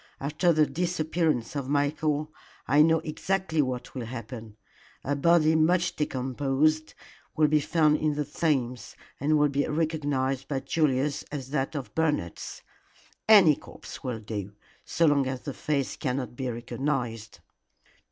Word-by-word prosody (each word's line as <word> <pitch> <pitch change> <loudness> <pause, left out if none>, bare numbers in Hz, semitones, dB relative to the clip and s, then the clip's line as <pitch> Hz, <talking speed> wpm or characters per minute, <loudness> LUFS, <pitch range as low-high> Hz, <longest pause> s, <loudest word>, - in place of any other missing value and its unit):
"After 150 +5 +1
the 155 -2 +4
disappearance 160 -6 -1
of 140 -2 -3
Michael 150 +1 0 0.3
I 145 +3 +5
know 160 +1 +4
exactly 160 +1 -1
what 125 -3 -4
will 125 -3 -5
happen. 115 -2 -8 0.5
A 145 - -1
body 160 +1 +4
much 165 +3 +2
decomposed 145 +3 0 0.4
will 155 -1 +5
be 150 0 +3
found 155 0 +3
in 150 -1 0
the 150 0 -1
Thames, 130 -6 -1 0.2
and 150 +3 +2
will 150 0 +3
be 140 +1 0
recognized 145 -4 -1
by 140 -2 -1
Julius 145 -2 0
as 135 -3 -6
that 140 +1 -1
of 140 -4 -5
Bernard's. 150 - -2 0.7
Any 190 -9 +8
corpse - - -11
will 125 -4 -3
do, 105 -2 -6 0.3
so 170 - +1
long 140 -3 +3
as 130 -1 -4
the 140 - -5
face 140 -2 -2
cannot 130 -3 -3
be 130 0 -3
recognized." 120 - -3
145 Hz, 140 wpm, -27 LUFS, 130-155 Hz, 0.7 s, Any